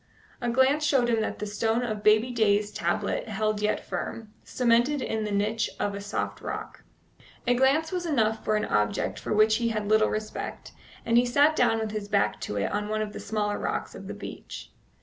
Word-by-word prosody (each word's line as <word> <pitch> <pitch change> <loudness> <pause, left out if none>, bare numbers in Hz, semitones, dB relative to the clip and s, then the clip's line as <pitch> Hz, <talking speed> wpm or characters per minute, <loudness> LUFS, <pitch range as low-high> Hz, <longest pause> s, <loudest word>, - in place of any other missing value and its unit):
A 240 - 0
glance 265 +5 +3
showed 270 -5 +3
him 225 -2 +2
that 220 - -2
the 210 - -4
stone 225 +3 0
of 215 -3 -3
baby 215 +4 +4
Day's 210 -3 +2
tablet 170 -3 -1
yet - - -8
held 215 0 -1 0.2
firm, 210 +4 -5
cemented 245 +4 +2
in 220 -4 -2
the 210 - -3
niche 210 +3 0
of 205 - -1
the 200 - -5
soft 200 - -3
rock. - - -6 0.6
A 245 - +4
glance 275 +6 +2
was 355 -2 -2
enough 225 -7 +1
for 215 - +1
an 210 - 0
object 105 -1 0
for - - -6
which 215 +1 +4
he 235 -1 0
had 215 -2 -2
little 215 0 +4
respect, 215 0 -5 0.3
and 230 +1 +4
he 245 - +2
sat 290 +5 +4
down 225 - +3
with 220 -1 -2
his 210 -1 -4
back 105 - +1
to 105 - -4
it 100 - -1
on 210 0 -2
one 215 0 0
of 210 - -6
the - - -6
smaller 210 -1 -2
rocks - - -3
of - - -9
the - - -6
beach. - - -9
215 Hz, 210 wpm, -27 LUFS, 210-240 Hz, 0.6 s, baby